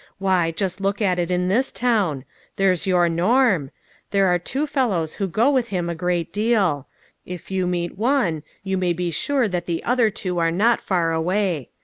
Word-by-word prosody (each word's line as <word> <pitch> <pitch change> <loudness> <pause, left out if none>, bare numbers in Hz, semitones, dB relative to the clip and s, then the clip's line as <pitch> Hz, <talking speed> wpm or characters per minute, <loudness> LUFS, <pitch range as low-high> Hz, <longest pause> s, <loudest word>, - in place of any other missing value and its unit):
Why, 185 -3 +1
just 190 +2 -3
look 200 +1 -1
at 185 -4 +1
it 175 0 -1
in 180 0 0
this 240 +8 +1
town. 200 - 0 0.3
There's 195 -1 +1
your 180 -2 +3
Norm. 185 - +2 0.4
There 195 -1 +2
are 180 0 +2
two 270 - -2
fellows 230 - -1
who 195 - +1
go 225 - +2
with 255 -4 +1
him 175 -5 -2
a - - -2
great 175 0 -2
deal. 205 - +1 0.4
If 180 +1 -9
you 185 -1 0
meet 175 +1 -3
one, 225 - +1 0.2
you 190 -1 -1
may 180 -1 +1
be 175 0 -2
sure 265 - 0
that 180 -3 -3
the 170 -1 -2
other 240 -2 +2
two 185 -3 -3
are 165 0 +2
not 215 +8 +2
far 170 -4 0
away. 170 - -1
185 Hz, 195 wpm, -22 LUFS, 170-215 Hz, 0.4 s, your